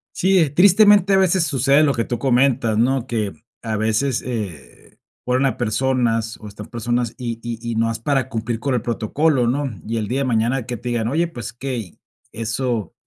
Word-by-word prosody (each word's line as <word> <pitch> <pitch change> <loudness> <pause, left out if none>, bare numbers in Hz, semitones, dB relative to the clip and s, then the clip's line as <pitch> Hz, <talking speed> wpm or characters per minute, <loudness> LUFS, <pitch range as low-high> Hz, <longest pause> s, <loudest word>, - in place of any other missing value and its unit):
Sí, 190 +1 +3
¿eh? 160 -5 +3
Tristemente, 200 +4 +5
a - - +5
veces 185 -2 +3
sucede 140 0 +3
lo 140 -2 +2
que 115 - -1
tú 120 - -3
comentas, 125 -3 +2
¿no? 130 +1 +1
Que 110 -5 -2 0.3
a 110 -1 -2
veces, 110 +4 0
eh, 105 - -7 0.3
ponen 130 +2 +1
a 135 - -1
personas 115 -1 0
o 105 - -9
están 105 +1 -10
personas, 120 0 -2
y 120 -3 -4
y 115 -1 -5
y - - -2
nomás 115 0 0
para 135 0 0
cumplir 115 0 -3
con 135 +3 -1
el 120 - 0
protocolo, 125 +4 +1
¿no? 135 +3 0 0.2
Y 115 +1 -2
el 105 -2 -3
día 130 +3 -1
de - - 0
mañana 120 +1 0
que 125 -1 -4
te 125 - -7
digan: 115 -2 -1
"Oye, 165 +6 0
¿pues 120 -7 -7
qué?". 130 +2 -4
Y 100 -7 -9 0.3
eso 115 0 -2
120 Hz, 200 wpm, -20 LUFS, 115-135 Hz, 0.3 s, Tristemente